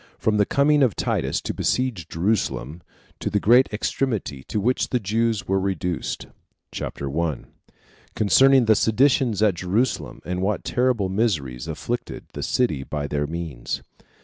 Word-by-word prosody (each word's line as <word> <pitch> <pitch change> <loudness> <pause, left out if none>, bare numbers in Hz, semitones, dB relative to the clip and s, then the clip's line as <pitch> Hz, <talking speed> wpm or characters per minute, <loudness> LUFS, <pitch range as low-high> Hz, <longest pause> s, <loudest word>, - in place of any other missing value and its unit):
From 110 -1 +1
The 105 - +3
Coming 145 +1 +3
Of 125 -8 +3
Titus - - -1
To - - -3
Besiege 120 -11 -1
Jerusalem, 85 - -1 0.4
To - - -2
The 105 - +1
Great 120 +6 +5
Extremity 105 - -2
To 105 - -2
Which 125 +5 +1
The 125 - +1
Jews 110 +1 0
Were 95 0 +2
Reduced. 90 -3 -2 0.5
CHAPTER 70 - -5
1. 80 0 -2 0.7
Concerning 130 +4 +5
The 110 - +6
Seditions 115 0 +2
At 105 -3 +4
Jerusalem 95 +8 -1
And 90 0 -2
What 100 +2 -1
Terrible 125 -5 +1
Miseries 85 - -1
Afflicted - - -4
The - - -5
City 120 - 0
By 75 +1 -4
Their 75 0 -1
Means. 80 -6 -5
105 Hz, 150 wpm, -23 LUFS, 85-120 Hz, 0.7 s, The